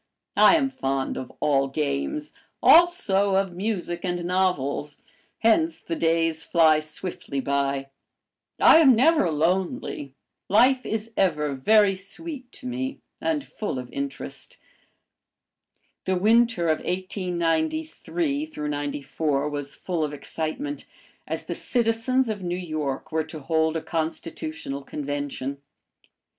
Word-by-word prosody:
I - - +7
am 290 -4 +2
fond 135 - -2
of 130 - -6
all 135 -2 +2
games, 150 - -2 0.3
also 215 - +5
of 195 -2 +1
music 180 -2 -3
and 175 -2 -2
novels, 150 -6 0 0.4
hence 320 +9 +3
the 165 - -4
days 165 -1 +1
fly 160 -2 +4
swiftly 155 -2 -5
by; 140 0 -1 0.7
I - - +8
am 275 -6 +7
never 280 - +4
lonely, 160 -3 -1 0.3
life 255 +5 +4
is 220 +1 -3
ever 150 -6 +1
very 205 +9 +4
sweet 255 - -7
to - - -12
me 260 +2 -3 0.2
and 310 -3 0
full 210 -11 -4
of 125 -1 -7
interest. 140 0 -6 1.5
The 190 - +1
winter 220 -1 +3
of 155 -1 +2
1893 190 - -1
94 145 0 -2
was 145 -1 -5
full 175 -4 -2
of 150 -1 -3
excitement, 165 - -4 0.4
as - - -3
the - - -3
citizens 240 +2 +1
of 215 -3 -3
New 175 0 -2
York 155 -7 -4
were 160 -1 0
to 160 0 -8
hold 160 +2 +1
a 160 - -5
Constitutional 165 - -4
Convention. 140 -1 -4
175 Hz, 120 wpm, -25 LUFS, 145-230 Hz, 1.5 s, I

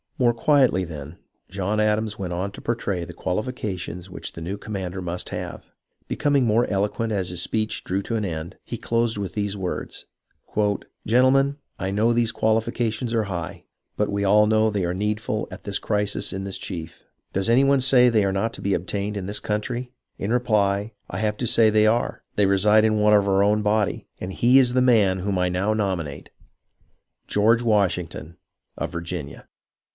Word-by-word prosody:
More 120 -2 +3
quietly, 130 -8 +3
then, 75 -2 -8 0.3
John 100 +2 -1
Adams 105 0 +1
went 90 -4 -4
on 95 +3 -2
to - - -11
portray 100 -6 -2
the 90 - -9
qualifications 95 -2 -4
which 90 - -5
the 80 - -8
new 90 +5 -3
commander 95 -3 -5
must 90 0 -4
have. - - -6 0.4
Be - - -3
coming 145 -3 +2
more 115 +2 +3
eloquent 105 +3 -1
as 95 -4 -1
his 90 -1 -2
speech 110 +3 -1
drew 95 +2 -2
to 115 - -3
an 110 -2 -1
end, 80 -2 -5
he - - -6
closed 115 -1 0
with 100 -3 -4
these 105 -1 -2
words: 95 -2 -5 0.5
" 105 -1 -2
Gentlemen, 135 +4 +4 0.2
I 95 - -2
know 110 +4 +2
these 115 -1 +2
quahfi 110 0 +1
cations 115 0 -2
are 110 -2 +1
high, 90 -4 -5 0.3
but 105 -1 0
we 100 0 -1
all 105 +2 +5
know 110 0 +3
they 100 -4 -1
are 85 - -1
needful 105 +2 -2
at - - -9
this 100 -1 -2
crisis 105 -1 -1
in 95 +1 -4
this 95 - -3
chief. 80 -2 -7 0.3
Does 95 +3 0
any 125 +4 +5
one 140 -1 +3
say 125 -1 +6
they 110 -4 +3
are 95 - 0
not 105 +4 -1
to - - -7
be 100 -1 +1
obtained 100 +4 -3
in 95 - -4
this 105 +2 -3
country 120 +4 -3 0.3
1 - - -4
In 110 - 0
reply, 105 -3 +1 0.2
I - - -5
have 105 -1 -1
to 120 - -2
say 110 0 +4
they 110 0 +4
are; 115 +2 0
they 105 - +3
reside 105 +3 +4
in 110 -1 +2
one 105 0 +4
of 100 -1 +4
our 100 0 +3
own 105 +1 +3
body, 105 -1 0
and 95 +1 -5
he 125 +6 +4
is 125 -2 +4
the 130 - +3
man 105 -7 +4
whom 95 +1 -1
I 90 0 +1
now 95 +4 0
nominate, 90 -9 -3 0.5
— - - -43
George 115 +3 +3
Washington 90 -6 0 0.4
of 80 - -3
Virginia. 85 -4 -6
105 Hz, 200 wpm, -24 LUFS, 95-110 Hz, 0.5 s, say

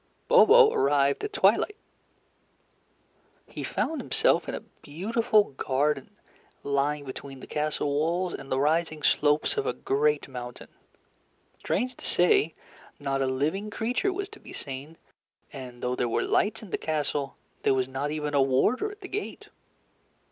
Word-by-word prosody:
Bobo 475 -1 +7
arrived 140 0 +2
at 420 - -3
twilight. 420 0 +3 1.7
He - - -7
found 320 - -2
himself - - +2
in - - -2
a - - -4 0.2
beautiful 210 +6 +1
garden, 135 +1 -1 0.5
lying 140 +1 0
between 135 0 -8
the - - -10
castle 150 0 -2
walls 170 +5 0
and 135 - -8
the 130 - +1
rising 155 +1 +1
slopes 150 - +2
of 430 - 0
a - - 0
great 440 +3 0
mountain. 125 -2 -8 0.9
Strange 250 +6 -2
to - - -11
say, 170 -3 +3 0.4
not 135 -1 -1
a 135 - +1
living 155 +11 -1
creature 245 - -1
was 390 +1 -4
to 425 - -13
be - - -12
seen, 140 +4 -7 0.6
and 125 -3 -9
though 125 0 0
there 120 - -1
were - - 0
lights 210 +2 +1
in 200 - -11
the - - -1
castle, 145 -3 -2 0.2
there 135 - +3
was 130 -1 0
not 135 +2 -3
even 150 -1 -3
a 140 - +4
warder 135 - +2
at 415 +1 -12
the 375 - -7
gate. 415 +2 -5
150 Hz, 155 wpm, -27 LUFS, 135-220 Hz, 1.7 s, Bobo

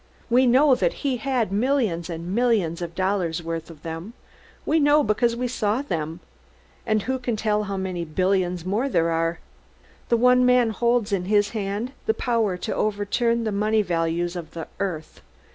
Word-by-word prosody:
"We 255 +2 +5
know 265 +3 +5
that - - +1
he 265 -3 +1
has 240 -4 -1
millions 210 - 0
and 170 +2 -5
millions 210 -8 +1
of 170 -1 -5
dollars' 185 -3 -1
worth 165 0 -4
of 160 -2 -13
them 165 +6 -6 0.5
we 320 +2 +2
know 295 0 +4
because 230 +2 +1
we 250 +1 -2
saw 230 +1 -1
them 165 - -4 0.7
and 215 -2 +1
who 260 +2 -2
can 245 -2 -2
tell 210 -1 0
how 195 -1 -4
many 185 -2 -3
billions 180 +1 0
more 215 +9 0
there 165 -8 +1
are? 165 +1 0 0.7
The 235 - +4
one 250 +1 +5
man 250 -2 +4
holds 235 0 +1
in 190 -3 0
his 205 +1 +2
hand 210 +3 -3 0.2
the 445 - +2
power 225 -6 0
to - - -3
overturn 220 +3 0
the 220 - -1
money 215 +1 +1
values 170 0 -1
of 170 -2 -8
the 165 - -5
earth!" 175 -6 -4
205 Hz, 180 wpm, -24 LUFS, 175-240 Hz, 0.7 s, We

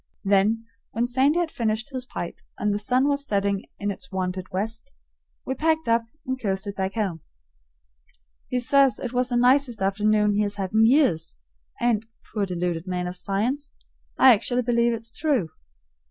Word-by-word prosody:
Then, 205 +3 +2 0.3
when 235 +1 +1
Sandy 265 +6 +2
had 345 -2 0
finished 225 +3 -2
his 255 -1 -4
pipe 175 - -6 0.2
and 210 0 0
"the 205 - -1
sun 255 +6 +2
was 285 -1 +1
setting 200 -1 0
in 205 0 -2
its 270 +6 -10
wonted 185 -1 -3
west," 225 +8 -4 0.5
we 265 - -1
packed 320 +2 0
up 230 0 +2 0.2
and 260 0 -3
coasted 200 -1 -2
back 190 0 -3
home. 190 -7 -2 1.3
He 250 - -1
says 270 -1 +4
it 245 -1 -5
was 250 0 +1
the 245 - +1
nicest 250 -1 +3
afternoon 210 +2 +2
he 205 - +1
has 205 -1 -1
had 195 -1 -4
in 220 +1 +5
years, 240 - +2 0.4
and, 225 -2 +1 0.3
poor 205 -2 0
deluded 175 -1 -2
man 180 -1 -2
of 180 0 -4
science, 235 +11 -2 0.4
I 260 -1 +8
actually 245 +3 0
believe 235 0 +2
it's 225 0 -5
true. 275 - 0
225 Hz, 170 wpm, -25 LUFS, 195-255 Hz, 1.3 s, I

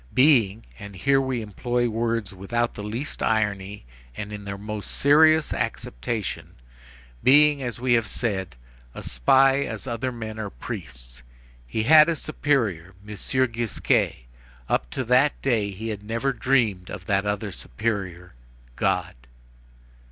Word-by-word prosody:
Being,—and 105 - +2
here 135 +7 +2
we 130 -3 -2
employ 120 +3 -1
words 115 -2 -2
without 120 +6 -2
the - - -7
least 115 +8 -5
irony 105 - -1 0.3
and 105 0 -5
in 105 -1 -7
their 100 0 -5
most 105 0 -6
serious 155 +2 +4
acceptation, 100 - -4 0.7
being, 145 +1 +5
as 120 -4 -4
we 125 0 +2
have 115 -3 +2
said, 95 - -3 0.4
a - - -7
spy 135 - +3
as - - -5
other 120 +1 -2
men 110 -2 -7
are 105 -2 -3
priests. - - -8 0.5
He 110 - -2
had 155 +5 +7
a 165 - +1
superior, 115 - -1
M. 105 - -6 0.4
Gisquet; 115 - 0 0.4
up - - 0
to 130 - -3
that 130 +4 +3
day 115 -6 +1
he 105 +4 -6
had 105 -2 -4
never 115 +6 -1
dreamed 115 -7 +1
of - - -7
that 100 -1 +1
other 105 0 -2
superior, 90 - -4 0.4
God. - - 0
110 Hz, 135 wpm, -24 LUFS, 100-130 Hz, 0.7 s, had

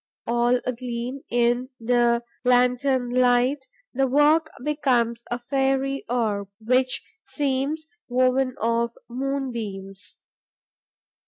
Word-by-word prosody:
All 240 +1 +2
agleam 250 +1 -4
in 240 +1 +1
the 240 0 +2 0.2
lantern 250 0 +2
light, 255 +2 +2 0.3
the 270 +1 +2
work 300 +4 +4
becomes 245 -6 +1
a 240 - -1
fairy 270 +2 0
orb, 215 -5 -1
which 255 +3 +1 0.2
seems 285 +2 -1 0.2
woven 255 +1 +2
of 230 +1 0
moonbeams. 235 -7 -4
250 Hz, 90 wpm, -24 LUFS, 235-270 Hz, 0.3 s, work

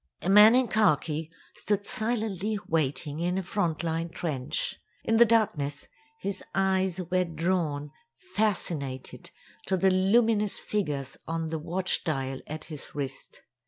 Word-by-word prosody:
A 190 - +1
man 210 +3 +9
in 255 -1 +3
khaki 160 -7 +1 0.2
stood 205 -1 -1
silently 215 -3 -1
waiting 150 -1 -1
in 175 +2 0
a 190 - -1
frontline 170 -3 -1
trench. 150 -7 -3 0.2
In 225 - +2
the 235 - +8
darkness, 175 -11 +1 0.3
his 200 0 -4
eyes 190 -1 +1
were 185 0 +3
drawn, 165 -4 -1 0.2
fascinated, 175 -7 -2 0.4
to 190 - +2
the 190 +1 +4
luminous 210 +2 +3
figures 150 -10 -2
on 165 0 -2
the 160 0 -2
watch 180 +4 -1
dial 135 -5 -2
at 155 +1 -6
his 150 -4 -10
wrist. 140 -3 -6
175 Hz, 130 wpm, -28 LUFS, 155-200 Hz, 0.4 s, man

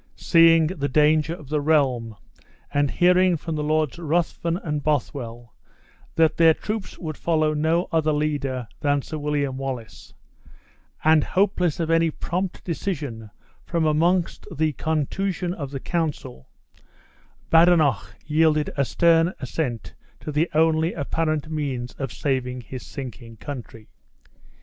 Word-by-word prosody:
Seeing 165 -1 +5
the 155 -4 -2
danger 155 +3 +3
of 150 -6 -13
the 150 -1 0
realm, 130 -7 +1 0.6
and 145 -1 +2
hearing 180 +1 +3
from 160 +2 -5
the 150 -1 -2
Lords 155 -1 0
Ruthven 170 +1 -1
and 150 -5 -3
Bothwell 120 -6 -3 0.6
that 160 -1 +3
their 165 -1 +6
troops 215 -2 -5
would 155 -4 -6
follow 155 -2 +1
no 160 +4 +1
other 160 -2 +2
leader 145 -5 -1
than 145 -1 +1
Sir 155 - -6
William 145 -2 -1
Wallace, 130 -4 -7 0.9
and 155 -1 +5
hopeless 180 -4 +1
of 165 -1 -1
any 165 0 +3
prompt 180 +4 -4
decision 145 - -4 0.3
from 170 -2 -1
amongst 170 +3 +1
the 155 0 0
contusion 175 +5 -2
of 145 -7 -6
the 135 -1 -5
council, 145 - -4 1.0
Badenoch 165 - +4
yielded 155 -1 +2
a 140 - +2
stern 165 +4 +3
assent 125 -3 -4 0.3
to 150 - -6
the 155 +4 +1
only 160 +1 +3
apparent 155 0 -1
means 135 -5 -3
of 135 -4 -3
saving 125 -3 -2
his 125 +2 -8
sinking 120 -4 -9
country. 115 -4 -8
155 Hz, 130 wpm, -23 LUFS, 140-165 Hz, 1.0 s, their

